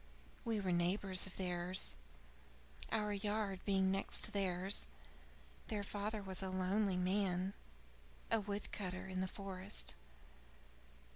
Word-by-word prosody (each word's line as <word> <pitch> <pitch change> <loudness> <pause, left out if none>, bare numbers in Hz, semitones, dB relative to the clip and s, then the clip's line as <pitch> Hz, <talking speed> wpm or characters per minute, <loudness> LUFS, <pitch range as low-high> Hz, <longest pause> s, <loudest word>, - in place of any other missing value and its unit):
We 225 -3 +1
were 190 -2 0
neighbors 185 +2 +4
of 190 - -10
theirs, 180 0 +1 1.0
our 210 -2 +2
yard 205 -1 0
being 190 -1 +4
next 195 +1 -1
to - - +1
theirs. 190 0 +2 0.8
Their 210 -2 -1
father 205 +1 -2
was 190 -1 -4
a 190 - -1
lonely 185 +1 +2
man; 185 0 +2 0.8
a 225 - +5
wood 205 0 -3
cutter 185 -1 -3
in 185 -1 -2
the 190 - +1
forest. 195 +1 -3
195 Hz, 125 wpm, -39 LUFS, 185-205 Hz, 1.0 s, a